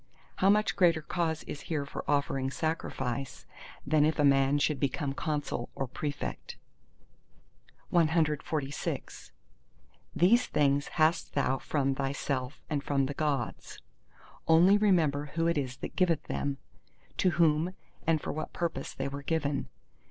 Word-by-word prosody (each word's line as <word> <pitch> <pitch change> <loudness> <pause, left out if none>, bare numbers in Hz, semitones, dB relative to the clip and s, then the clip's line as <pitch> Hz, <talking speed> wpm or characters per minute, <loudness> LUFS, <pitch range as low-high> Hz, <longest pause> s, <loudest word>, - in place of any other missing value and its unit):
How 190 - +4
much 210 +1 +3
greater 170 -4 +3
cause 165 -1 -1
is 145 - -7
here 150 -4 -1
for 140 - -6
offering 140 -2 +1
sacrifice, 135 -4 -3 0.4
than 150 +1 +3
if 155 +1 +2
a 150 - +2
man 135 0 +4
should 145 -1 +1
become 140 0 -1
Consul 145 -5 -3
or 135 - -2
Prefect? 145 +3 -5 1.4
CXLVII 155 - 0 0.9
These 195 +10 +4
things 140 -1 +2
hast 160 +1 +1
thou 135 -2 +1
from 135 -2 0
thyself 135 0 -3
and 145 -3 -2
from 140 -2 +1
the 140 - -3
Gods: 140 -5 -2 0.7
only 170 +5 +6
remember 165 -9 +2
who 165 0 +1
it 170 0 +2
is 130 -3 -2
that - - -7
giveth 175 -5 +2
them—to 135 - -4
whom 165 +1 +2 0.3
and 165 -1 +3
for - - -4
what 155 - -5
purpose 165 -6 -3
they - - -2
were 140 +1 -5
given. 145 -2 -1
150 Hz, 135 wpm, -30 LUFS, 140-165 Hz, 1.4 s, only